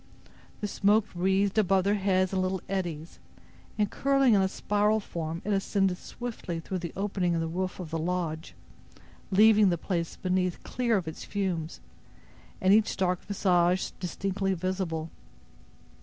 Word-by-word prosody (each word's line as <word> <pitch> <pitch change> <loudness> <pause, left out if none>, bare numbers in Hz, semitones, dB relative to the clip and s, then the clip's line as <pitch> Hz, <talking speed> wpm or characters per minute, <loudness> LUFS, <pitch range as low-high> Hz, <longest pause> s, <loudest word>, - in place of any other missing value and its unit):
The 210 - -1
smoke 205 +1 +3
wreathed 190 +3 +1
above 190 -2 +3
their 200 +2 +2
heads 190 -2 +1
in 190 - +1
little 185 -1 -2
eddies, 170 -5 -4 0.6
and 210 -2 +1
curling 275 -3 +3
in 200 - +5
a 190 - +3
spiral 210 +2 +1
form 165 -4 -5
it 210 - 0
ascended 195 -1 +1
swiftly 220 -8 -6
through 185 +3 -4
the 170 -2 -5
opening 190 -3 0
in - - 0
the 165 - -1
roof 185 +3 -3
of 170 -4 -7
the 165 - -1
lodge, 165 -1 -3 0.7
leaving 210 0 +6
the 175 - +1
place 170 -1 -3
beneath 185 -1 -1
clear 235 -3 0
of 180 -4 -4
its 160 - -6
fumes, 180 -5 -3 0.8
and 190 +1 +4
each 215 0 +3
dark 180 -1 0
visage 185 -2 +2
distinctly 195 +1 -2
visible. 175 -3 -3
190 Hz, 155 wpm, -28 LUFS, 175-200 Hz, 0.8 s, leaving